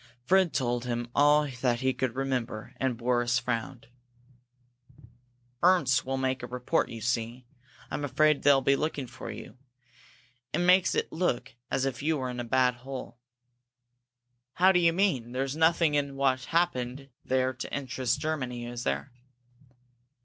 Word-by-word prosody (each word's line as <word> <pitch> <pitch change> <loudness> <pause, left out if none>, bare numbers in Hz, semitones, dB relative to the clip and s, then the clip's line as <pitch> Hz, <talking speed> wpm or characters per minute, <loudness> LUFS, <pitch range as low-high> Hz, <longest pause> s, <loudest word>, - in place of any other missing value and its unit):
Fred 185 0 +4
told 120 -2 -1
him 120 -1 -3
all 150 +1 +4
that 125 -1 +1
he 130 0 +1
could 130 -2 -2
remember, 125 -4 -3
and 130 -3 -1
Boris 120 0 +1
frowned. 120 0 -3 1.7
"Ernst 145 -8 +3
will 135 0 -1
make 130 -1 -1
a 120 - -6
report, 125 0 -1
you 115 -1 -8
see," 115 +1 +1
he 125 - -15
said. 125 +1 -27
"I'm 145 - -3
afraid 145 +2 +2
they'll 140 -1 +5
be 140 +1 +3
looking 145 -2 -2
for 120 - -9
you. 125 - -9 0.9
It - - +1
makes 180 +1 +4
it - - -1
look 160 -7 -1 0.2
as 135 - 0
if 130 -2 -3
you 155 +2 +1
were 130 -2 -3
in 125 - -6
a - - -2
bad 125 +1 +2
hole." 130 -1 -8 1.3
"How 185 +2 +5
do 180 - +3
you 170 -1 +4
mean? 155 - 0
There's 135 +2 -2
nothing 160 -1 +3
in 140 -1 0
what 130 -1 +1
happened 135 -6 -1
there 130 0 +1
to 130 - -7
interest 135 -3 -2
Germany, 130 -6 -3
is 120 0 -6
there?" 70 +1 -2
130 Hz, 160 wpm, -28 LUFS, 125-145 Hz, 1.7 s, they'll